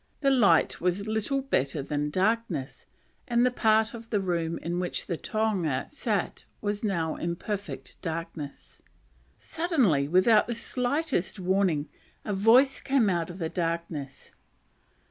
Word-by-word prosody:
The 275 -1 +3
light 205 -11 +4
was 180 +3 0
little 220 +6 -1
better 140 - 0
than 145 +1 -2
darkness; 185 - -1 0.4
and 240 -1 +3
the 250 - +3
part 220 -2 +2
of 230 -1 -9
the 210 - +1
room 170 -3 -1
in 175 +2 -3
which 180 -1 -3
the 175 - -2
tohunga 190 - -1
sat 220 -10 -2 0.2
was 205 +1 -2
now 170 -6 0
in 170 0 -2
perfect 205 +2 -6
darkness. 160 -4 -6 0.6
Suddenly, 265 - +1
without 185 +7 +4
the 235 - -2
slightest 250 - -1
warning, 180 -5 +1 0.4
a 210 - -2
voice 235 +7 +5
came 265 -7 +2
out 170 -1 -1
of 175 - -8
the 165 -4 -2
darkness. 165 -5 -4
195 Hz, 140 wpm, -27 LUFS, 165-230 Hz, 0.6 s, voice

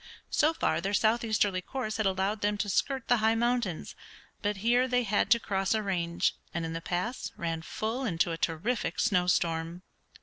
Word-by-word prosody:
So 310 0 +4
far - - +1
their 200 +1 0
southeasterly 215 -4 +2
course 220 0 -4
had 220 -2 +1
allowed 195 +3 0
them 205 0 +1
to 205 0 -2
skirt 265 +5 0
the 245 - +4
high 220 +1 +3
mountains, 235 -6 -1 0.5
but 205 -1 -1
here 245 +2 +4
they 250 -1 +2
had 205 -2 +1
to 235 +1 +6
cross 195 -1 0
a 215 - 0
range, 170 -4 0 0.2
and 170 -1 -1
in 165 - -4
the 165 - -4
pass 180 +9 -3
ran 165 -2 -2
full 220 +9 -3
into 170 -7 +1
a - - -1
terrific 190 +11 -1
snow 180 -6 +2
storm. 165 0 0
205 Hz, 190 wpm, -29 LUFS, 180-235 Hz, 0.5 s, to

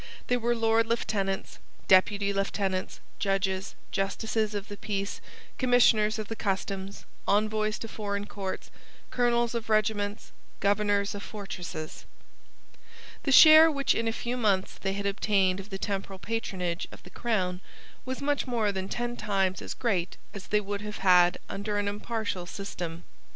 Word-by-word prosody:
They 245 - +3
were 240 0 +1
Lords 225 0 +2
Lieutenants, 200 -4 -1 0.3
Deputy 200 +1 +4
Lieutenants, 195 -1 -2 0.2
judges, 195 0 -1 0.2
justices 215 +2 -1
of 205 0 -4
the 205 - -7
Peace, 200 -1 -3 0.4
Commissioners 230 -4 +4
of 215 -2 -4
the 225 - -4
Customs, 195 -1 -3 0.2
Envoys 215 +1 +1
to 225 - -6
foreign 205 -2 -3
courts, 195 -2 -6 0.4
Colonels 240 -1 +2
of 230 -2 -4
regiments, 215 -1 0 0.3
Governors 205 0 +1
of 205 - -6
fortresses. 180 -7 -7 1.2
The 275 - -1
share 315 +3 +10
which 280 -3 +2
in 230 - -1
a - - +2
few 240 +2 -3
months 200 -5 +1
they 195 0 -1
had 200 0 -4
obtained 195 -2 +2
of 195 +1 -9
the 195 - -4
temporal 195 -1 -3
patronage 185 -5 -3
of - - -13
the - - -13
crown 185 -6 -1 0.4
was 260 +2 -5
much 285 -1 0
more 225 -4 +1
than 190 0 -4
ten 240 +2 -2
times 195 -4 0
as - - -5
great 195 -8 -1 0.2
as 195 -2 -8
they 210 0 +2
would 200 0 -4
have 210 0 -6
had 180 -2 +5
under 205 +1 -3
an 205 0 0
impartial 205 -3 -3
system. 175 -4 -6
205 Hz, 150 wpm, -28 LUFS, 195-225 Hz, 1.2 s, share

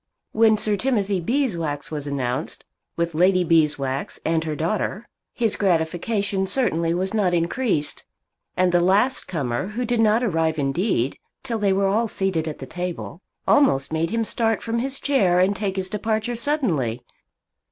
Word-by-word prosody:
When 220 -1 +4
Sir 210 -1 0
Timothy 205 -6 0
Beeswax 170 - -1
was 145 -2 -4
announced, 135 0 -3 0.3
with 170 -1 -1
Lady 180 +3 +3
Beeswax 150 -5 +1
and 160 0 +1
her 155 -1 -2
daughter, 205 +6 -2 0.2
his 225 -3 +1
gratification 190 +3 0
certainly 175 -10 +1
was 190 +3 -2
not 190 -5 +2
increased. 170 - -1 0.5
And 185 -1 +3
the 175 - +4
last 200 +9 +2
comer, 140 -2 -2
who 230 +4 -3
did 240 0 0
not 225 +2 +3
arrive 165 -7 0
indeed 140 - 0 0.2
till 235 -4 -3
they 200 -2 +2
were 195 +1 +2
all 215 +4 +2
seated 190 -6 -1
at 155 - -4
the 135 - -7
table, 175 +4 -5 0.3
almost 150 - +3
made 160 +1 0
him 230 0 -1
start 225 -1 0
from 230 0 -1
his 270 +2 -2
chair 200 -11 +2
and 190 +2 +3
take 200 -2 -2
his 190 -1 -2
departure 220 +4 -2
suddenly. 180 - -1
190 Hz, 160 wpm, -23 LUFS, 160-220 Hz, 0.5 s, When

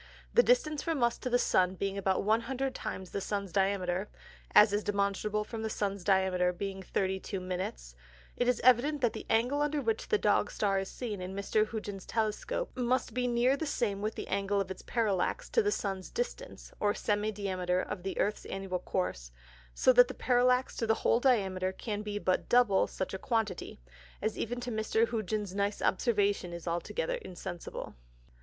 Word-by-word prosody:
The 480 - +7
Distance 320 -13 +2
from 320 -6 -1
us 235 0 +2
to 255 - -3
the 245 - +4
Sun 185 -5 +2
being 195 +1 -2
about 190 -1 0
100 245 +5 0
times 190 -7 -6
the 200 - -3
Sun's 200 -2 -3
Diameter 190 0 0 0.5
(as 210 -1 +8
is 205 +1 +1
demonstrable 205 +1 0
from 220 +1 -6
the 220 - -2
Sun's 200 -3 -2
Diameter 185 -1 +3
being 195 +1 -4
32 190 +1 -2
Minutes) 180 - -4 0.4
it 245 - 0
is 250 - +2
evident, 255 +4 +4
that 240 -3 +2
the - - -7
Angle 245 +6 +2
under 295 0 +1
which 445 +9 -1
the 440 - +3
Dog - - +2
Star 195 -2 +1
is 195 - -4
seen 215 -6 -5
in 185 +1 -5
Mr. 215 +2 +1
Hugens's 205 -4 -6
Telescope, 225 - -2
must 250 +1 0
be 250 0 0
near 245 +2 +3
the 310 +2 -3
same 210 -8 -1
with 215 +1 -2
the - - -5
Angle 200 +1 0
of 190 -1 -2
its 190 - -7
Parallax 225 - -1
to 460 - +4
the 415 -1 +1
Sun's 195 - -3
Distance, - - -5
or 205 0 +2
Semi 210 +1 0
diameter 185 -3 -1
of 190 0 -4
the 190 +1 -4
Earth's 210 - 0
Annual 195 -1 -3
Course; 60 - -3 0.4
so 255 - +5
that 245 0 +7
the - - -7
Parallax 250 +1 +2
to 230 - -1
the 220 - +4
whole - - +4
Diameter, 190 -8 +2
can 205 +2 -4
be 210 -1 -4
but 185 -3 0
double 240 -6 +4
such 190 - -4
a 190 - -3
quantity, 220 - -2 0.4
as 215 +1 -1
even 245 +2 -3
to 245 0 -4
Mr. 220 +1 +1
Hugens's 215 -3 -2
nice 200 +1 -1
Observation 200 -4 +1
is 170 0 -8
altogether 475 - -2
insensible. 180 - -7
205 Hz, 190 wpm, -31 LUFS, 190-245 Hz, 0.5 s, as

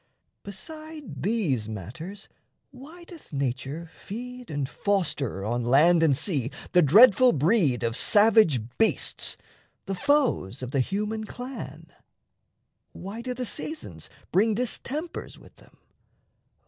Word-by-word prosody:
Beside 310 +9 -9
these 165 - 0
matters, 125 - -8 0.4
why 305 +7 -13
Doth 340 -2 -14
nature 140 +3 -3
feed 250 +3 -8
and 145 -3 -2
foster 145 - -1
on 120 +3 -1
land 150 +8 +4
and 150 -5 +3
sea 140 - -1 0.2
The 180 - +5
dreadful 225 - +7
breed 150 - +2
of 115 -1 -1
savage 205 - +5 0.2
beasts, 225 - +1 0.5
the 195 - -3
foes 190 - +1
Of 125 - -5
the 140 - 0
human 210 - -2
clan? 250 +4 -8 1.0
Why 200 +5 -7
do 250 +1 -4
the 250 0 -3
seasons 310 +7 -5 0.2
bring 215 +3 +3
Distempers 275 +7 -4
with - - -18
them? - - -21
195 Hz, 120 wpm, -26 LUFS, -, 1.0 s, dreadful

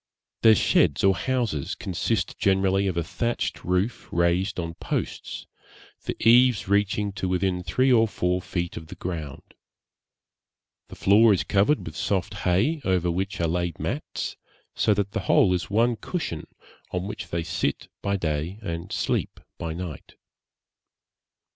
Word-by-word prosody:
Their 110 -1 +7
sheds - - +3
or 95 0 +6
houses 120 - -1
consist 95 +2 -2
generally 95 0 +2
of 90 -3 -2
a 85 - +1
thatched 115 +8 -2
roof 90 +6 -1
raised 85 +3 +1
on 85 -1 -3
posts, - - -4 0.6
the - - -2
eaves 120 -2 +5
reaching 100 +1 +1
to 95 -1 -3
within 90 0 0
three 130 +10 +2
or 115 -1 +5
four 90 -2 -1
feet 85 -1 -3
of 80 - -8
the - - -9
ground; 80 -6 -6 1.3
the - - -11
floor 105 +2 +5
is 95 - 0
covered 105 +9 +2
with - - -7
soft 95 0 -1 0.2
hay, 120 - +2
over 90 -2 +1
which 95 +3 -2
are 85 - +1
laid 85 -1 -1
mats, - - -4 0.4
so 105 - +2
that 100 -1 -1
the - - -2
whole 90 - +5
is 90 - -2
one 115 +3 +3
cushion, 105 - -4 0.4
on 90 0 -3
which 105 - -6
they 85 -1 -2
sit 80 -3 -2
by 100 0 0
day 80 +2 -2
and 85 -2 -5
sleep - - -1 0.2
by 80 - -3
night. 85 -2 -7
95 Hz, 150 wpm, -25 LUFS, 85-105 Hz, 1.3 s, Their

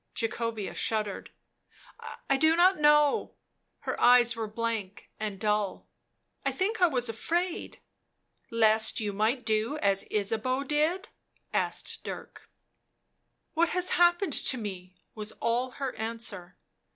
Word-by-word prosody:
Jacobea 225 -2 -3
shuddered. 215 -3 -1 1.0
"I 275 - +3
do 315 +4 +4
not 365 +1 +4
know;" 295 -1 +3 0.5
her - - -4
eyes 245 -1 +6
were 225 -1 -3
blank 220 -3 -4
and 210 -3 -4
dull. 210 -2 -1 0.3
" - - -47
I - - 0
think 405 +3 -2
I 355 - +7
was 250 -6 +1
afraid 340 +10 -2 0.3
" - - -50
" - - -41
Lest 220 -1 +3
you 210 -2 -2
might 220 +5 0
do 220 +6 0
as 195 -7 +1
Ysabeau 225 +6 -1
did?" 310 +8 0 0.4
asked - - -2
Dirk. - - -9 1.0
"What 335 +1 +2
has 365 +1 -1
happened 345 -1 +3
to 260 - +2
me?" 185 -4 -7 0.2
was 215 0 -5
all 240 +2 -1
her 270 -2 -4
answer. 220 -5 -3
230 Hz, 135 wpm, -28 LUFS, 215-300 Hz, 1.0 s, I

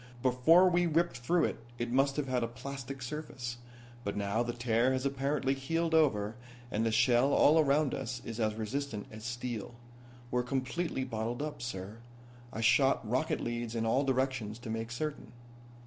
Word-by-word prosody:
Before 130 +9 +6
we 175 -1 +3
ripped 165 -2 +1
through 165 +8 +2
it - - -2
it 120 0 -3
must 135 +2 +3
have 150 -2 -1
had 130 -1 0
a 115 - 0
plastic 135 +2 -7
surface. 125 -3 -5 0.5
But 100 -1 -3
now 100 +2 0
the 120 0 -1
tear 120 +1 +1
has 130 +1 -1
apparently 140 0 0
healed 165 +5 -1
over, 110 -10 +3 0.4
and 110 0 0
the 115 - +1
shell 120 +3 +4
all 155 +3 +6
around 145 -1 +3
us 120 -2 -3
is 115 0 -5
as 110 -1 +1
resistant 110 0 -3
as 110 0 -9
steel. 120 -1 -4 0.6
We're 125 - +2
completely 135 +4 -2
bottled 120 +1 -3
up, 150 -4 -5
sir. 105 -2 -5 0.5
I 115 - -4
shot 135 0 +4
rocket 130 +7 0
leads 120 -1 -3
in 115 -1 0
all 130 +5 +2
directions 130 -5 -1
to 115 - -5
make 115 0 -3
certain." 145 +4 -4
125 Hz, 175 wpm, -32 LUFS, 115-140 Hz, 0.6 s, Before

